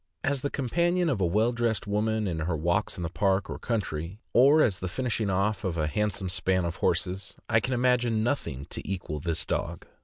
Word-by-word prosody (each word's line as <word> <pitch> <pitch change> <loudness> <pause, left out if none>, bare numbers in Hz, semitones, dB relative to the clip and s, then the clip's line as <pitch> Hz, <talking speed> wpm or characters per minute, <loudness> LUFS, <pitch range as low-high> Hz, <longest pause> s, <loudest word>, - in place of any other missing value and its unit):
As 140 -2 0
the 140 - -1
companion 170 +7 +1
of 110 -7 -1
a - - +4
well 110 +7 +2
dressed 115 -3 -1
woman 110 +1 0
in 85 -3 -2
her 80 0 -1
walks 85 +7 0
in 85 -2 -2
park 95 +2 +1
or - - -5
country, 95 -6 -3 0.2
or 140 +5 +6
as 100 -3 +1
the 95 - -3
finishing 115 0 -1
off 100 +3 0
of 90 -4 -2
a 75 - +1
handsome 105 +4 -1
span 95 0 +1
of 85 - -3
horses, 95 +1 -1
I 110 - +4
can 125 +3 -1
imagine 120 -3 +2
nothing 80 - -2
to - - -4
equal 90 -6 -3
this 85 +3 -1
dog. - - -3
105 Hz, 205 wpm, -28 LUFS, 90-120 Hz, 0.2 s, or